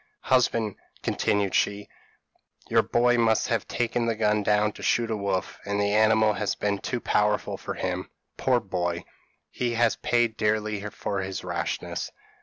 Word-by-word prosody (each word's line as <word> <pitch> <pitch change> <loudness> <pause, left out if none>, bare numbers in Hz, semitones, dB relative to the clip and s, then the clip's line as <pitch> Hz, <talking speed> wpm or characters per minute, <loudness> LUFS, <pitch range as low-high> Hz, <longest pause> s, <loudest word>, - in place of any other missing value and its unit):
'Husband,' 115 -4 +2 0.3
continued 100 -2 0
she, 100 0 +1 0.8
'your - - +5
boy 120 0 +2
must 110 0 +2
have 115 -4 0
taken 120 0 -1
the 115 - +1
gun 105 -1 +2
down, 105 +1 +2
to - - -12
shoot 115 -1 +1
a - - +1
wolf, 100 -2 -2
and 100 0 -2
the 100 0 +1
animal 110 0 +4
has 105 -1 -1
been 100 -1 -1
too 125 - -3
powerful 105 -2 +1
for - - -6
him. - - -3 0.3
Poor 125 -2 +2
boy! 90 -4 -3 0.5
he 120 -1 -1
has 115 -1 +2
paid 120 -2 +1
dearly 105 -1 0
for 100 -1 -3
his 95 0 -4
rashness.' - - -3
105 Hz, 160 wpm, -26 LUFS, 100-115 Hz, 0.8 s, your